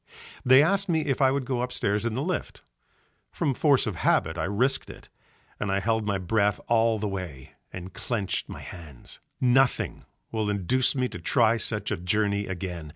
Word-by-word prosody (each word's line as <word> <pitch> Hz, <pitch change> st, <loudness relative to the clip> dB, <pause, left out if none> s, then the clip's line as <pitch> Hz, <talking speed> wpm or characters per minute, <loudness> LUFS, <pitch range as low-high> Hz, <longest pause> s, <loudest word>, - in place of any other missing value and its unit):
They 130 Hz, +2 st, +7 dB
asked 195 Hz, +4 st, +1 dB
me 160 Hz, -2 st, +2 dB
if 140 Hz, -3 st, -1 dB
I 135 Hz, -, +6 dB
would 135 Hz, 0 st, -1 dB
go 125 Hz, -1 st, -1 dB
upstairs 115 Hz, -3 st, -1 dB
in 110 Hz, -, -3 dB
the 135 Hz, -, -1 dB
lift, 180 Hz, +1 st, -4 dB, 0.7 s
from 140 Hz, -, 0 dB
force 140 Hz, 0 st, +3 dB
of 105 Hz, -7 st, -3 dB
habit 80 Hz, -1 st, +2 dB
I 80 Hz, -, -2 dB
risked 125 Hz, +8 st, 0 dB
it, -, -, -12 dB, 0.5 s
and 105 Hz, -, -1 dB
I 100 Hz, -, +1 dB
held 110 Hz, +1 st, 0 dB
my 100 Hz, -1 st, +1 dB
breath 100 Hz, +2 st, +1 dB
all 115 Hz, -1 st, +3 dB
the 105 Hz, 0 st, -2 dB
way 90 Hz, -9 st, -6 dB, 0.2 s
and 95 Hz, 0 st, -8 dB
clenched 100 Hz, -2 st, -3 dB
my -, -, -8 dB
hands. 75 Hz, -7 st, -11 dB, 0.2 s
Nothing 130 Hz, +1 st, +2 dB, 0.3 s
will 110 Hz, -2 st, -1 dB
induce 105 Hz, +8 st, +1 dB
me 130 Hz, -1 st, +1 dB
to 90 Hz, -, -8 dB
try 110 Hz, +7 st, +3 dB
such 110 Hz, -, -1 dB
a -, -, 0 dB
journey 100 Hz, +3 st, 0 dB
again. 90 Hz, -4 st, -5 dB
110 Hz, 185 wpm, -26 LUFS, 95-130 Hz, 0.7 s, They